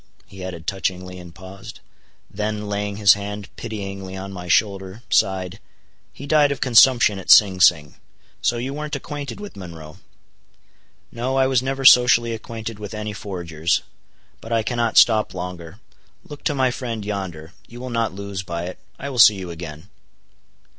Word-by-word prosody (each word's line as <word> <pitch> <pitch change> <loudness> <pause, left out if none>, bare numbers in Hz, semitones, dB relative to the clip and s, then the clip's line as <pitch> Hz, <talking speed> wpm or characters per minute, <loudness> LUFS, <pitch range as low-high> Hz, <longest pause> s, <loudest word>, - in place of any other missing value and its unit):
he 95 -1 -11
added 85 -3 -7
touchingly, 90 -1 -3
and 85 -1 -12
paused. 100 +5 -11 0.5
Then, 105 0 -4
laying 100 0 -3
his 100 -2 +6
hand 100 0 -7
pityingly 100 -4 -6
on 95 +1 -7
my 90 -1 -8
shoulder, 95 +3 0
sighed, 95 -2 +1 0.5
"he 140 - -10
died 145 -1 +4
of 140 - -3
consumption 120 -4 +5
at 95 - -10
Sing 95 -3 +7
Sing. 75 -5 +4 0.5
So 120 - +1
you 130 +3 -4
weren't 150 +1 -4
acquainted 145 +2 -6
with 205 -1 -9
Monroe?" 85 -3 -10 1.1
"No, 125 +3 -2
I 135 0 +3
was 130 -2 +2
never 135 +1 -3
socially 125 -2 +6
acquainted 115 -1 -7
with 105 +1 -7
any 105 0 -4
forgers. 85 -5 -2 0.6
But 115 - -11
I 115 -1 +1
cannot 120 0 -1
stop 110 -4 +5
longer. 90 -2 -7 0.4
Look 145 -1 -11
to 145 - +1
my 130 -2 +2
friend 115 -4 -5
yonder. 95 -5 -5
You 120 - -11
will 130 0 -6
not 115 -1 0
lose 100 0 -6
by 85 -2 -5
it. 90 +1 -7 0.2
I 140 - -6
will 125 - -4
see 105 -2 +8
you 95 -3 -6
again." 80 0 -9
105 Hz, 165 wpm, -22 LUFS, 95-120 Hz, 1.1 s, see